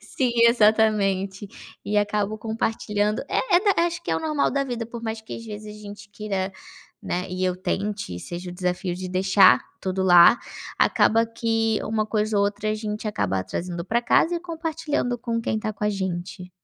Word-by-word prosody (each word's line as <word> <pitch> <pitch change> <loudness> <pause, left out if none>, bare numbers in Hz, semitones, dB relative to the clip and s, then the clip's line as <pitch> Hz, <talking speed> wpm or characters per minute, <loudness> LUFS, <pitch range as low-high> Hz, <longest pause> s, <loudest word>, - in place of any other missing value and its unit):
sim, 245 +4 -1 0.2
exatamente, 210 -4 +2 0.4
e 210 - -1
acabo 205 +1 -1
compartilhando. 215 0 -1
É 370 -7 +2
da - - +2
acho 340 0 -4
que - - -4
é - - +2
o - - -3
normal 305 -2 0
da 275 0 0
vida, 240 -3 -4
por 235 0 -8
mais 220 -1 -4
que, 220 - -8
às 230 - -9
vezes, 210 -1 -8
a - - -13
gente 205 -1 -10
queira, 200 -2 -3 0.5
né, 180 +1 -2
e 185 +1 -2
eu 185 -1 0
tente 200 - -3
e 90 - -8
seja 175 +1 -6
o 175 - -9
desafio 180 0 -2
de 185 +1 -6
deixar 190 +1 +5 0.2
tudo 190 0 -2
lá, 175 +4 +7 0.4
acaba 225 +1 +3
que 225 -1 0
uma 215 -1 -1
coisa 215 0 0
ou 200 - +3
outra 205 +1 -2
a - - 0
gente 215 0 -4
acaba 95 - -1
trazendo 170 - -4
pra 235 +4 +1
casa 330 +7 +3
e 335 - -5
compartilhando 320 -7 -2
com 230 -1 -2
quem 220 - -1
está 215 0 -3
com 210 0 -5
a 210 - +2
gente. 180 -1 -4
210 Hz, 195 wpm, -24 LUFS, 190-230 Hz, 0.5 s, lá